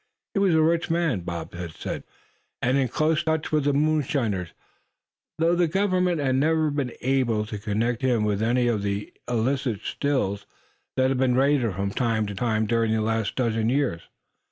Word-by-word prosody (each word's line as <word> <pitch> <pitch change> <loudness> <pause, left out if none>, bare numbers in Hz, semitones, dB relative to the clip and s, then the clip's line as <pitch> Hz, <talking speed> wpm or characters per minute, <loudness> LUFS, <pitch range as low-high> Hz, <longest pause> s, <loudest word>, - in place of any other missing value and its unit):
He 195 - +1
was 190 -4 +3
a 160 - +4
rich 165 +1 +1
man, 165 - +1
Bob 85 -2 -6
had 85 -2 -6
said, - - -5 0.6
and 125 +2 +1
in 135 -2 +2
close 155 +5 +1
touch 160 -1 -1
with 150 -2 +1
the 145 - +3
moonshiners; 140 - 0 0.9
though 165 +1 +3
the 175 -1 +3
Government 185 -1 +1
had 130 -2 +1
never 155 +1 +2
been 140 -4 -2
able 125 -5 +1
to 105 -1 -6
connect 110 +4 -1
him 125 -5 +2
with 105 -1 0
any 120 +2 +2
of 115 -4 +1
the 100 0 -3 0.2
illicit 120 -1 0
Stills 105 -8 -1 0.5
that 130 0 +3
had 135 -1 0
been 130 -2 +2
raided 130 -6 +2
from 100 +2 -2
time 115 -2 0
to 100 - -5
time 110 +1 0
during 115 0 +1
the 110 - +1
last 110 -1 -1
dozen 115 -3 0
years. 130 -10 0
125 Hz, 180 wpm, -25 LUFS, 110-145 Hz, 0.9 s, a